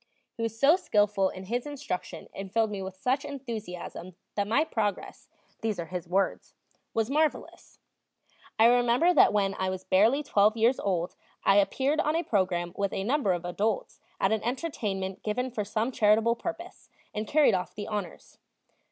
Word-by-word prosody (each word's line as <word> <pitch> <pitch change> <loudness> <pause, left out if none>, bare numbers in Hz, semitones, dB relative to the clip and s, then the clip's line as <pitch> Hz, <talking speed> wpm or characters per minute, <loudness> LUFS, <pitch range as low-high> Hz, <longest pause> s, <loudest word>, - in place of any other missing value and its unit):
He - - -7
was 225 0 -3
so 295 +7 +6
skillful 205 - +2
in 185 - -8
his 240 +7 -3
instruction 285 -10 -5
and 195 -1 -7
filled 225 0 +1
me 200 -2 -4
with 190 0 -6
such 260 +6 0
enthusiasm 220 -10 -7 0.2
that 205 -1 -1
my 235 +8 +3
progress 210 - -3 0.3
these 220 -4 -2
are 170 - -3
his 180 0 -6
words 195 +2 -1 0.4
was 225 +2 0
marvelous. 310 +1 -1 0.8
I 220 - +6
remember 245 +8 +4
that - - +6
when 195 -2 +1
I 190 0 0
was 185 0 -4
barely 225 +12 +3
twelve 215 -3 +3
years 235 +4 +3
old 180 -3 -1 0.3
I 195 - +5
appeared 265 +9 +2
on 305 +1 +1
a 335 - +1
program 180 - 0
with 200 -1 -1
a 195 - -2
number 255 -2 +1
of 175 -1 -2
adults 200 +4 -2 0.2
at 195 - +2
an 220 -1 +1
entertainment 210 - -3
given 250 +4 -2
for 215 -3 -2
some 220 +4 -1
charitable 220 0 +3
purpose, 340 +6 -7 0.2
and 215 +1 -3
carried 300 +3 +4
off 180 -1 -2
the 205 - -5
honors. 205 -6 -6
215 Hz, 175 wpm, -28 LUFS, 195-250 Hz, 0.8 s, so